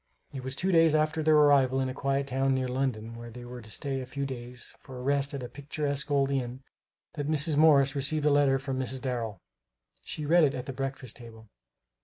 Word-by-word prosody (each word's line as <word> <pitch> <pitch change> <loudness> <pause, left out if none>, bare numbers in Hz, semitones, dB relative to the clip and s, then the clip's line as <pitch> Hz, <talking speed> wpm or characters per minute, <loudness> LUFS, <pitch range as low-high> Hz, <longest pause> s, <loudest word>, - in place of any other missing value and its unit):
It 135 -2 -6
was 130 0 -3
two 190 +7 0
days 165 -2 +5
after 155 +1 +1
their 155 0 +4
arrival 140 -3 +5
in 130 - 0
a 130 - -4
quiet 135 0 -1
town 135 0 +1
near 130 -1 -1
London 125 -4 -2
where 120 0 -9
they 120 +1 -10
were 125 0 -8
to 110 - -14
stay 135 +4 -3
a 130 - -7
few 140 +2 -3
days 125 -2 -7
for 130 -1 -10
rest 140 +1 +1
at 135 - -5
a - - -4
picturesque 140 +1 -3
old 140 -1 +2
inn, 130 -1 -3 0.5
that 145 -1 -3
Mrs. 155 0 +2
Morris 145 -3 +5
received 145 +2 0
a 150 - +5
letter 140 -2 +4
from 135 -1 -4
Mrs. 130 0 -2
Darrel. 115 -6 -3 0.7
She 150 - -5
read 170 +3 +5
it 145 -2 +2
at 125 -1 -5
the 135 - -5
breakfast 135 -2 -5
table. 110 -2 -13
135 Hz, 220 wpm, -28 LUFS, 125-145 Hz, 0.7 s, days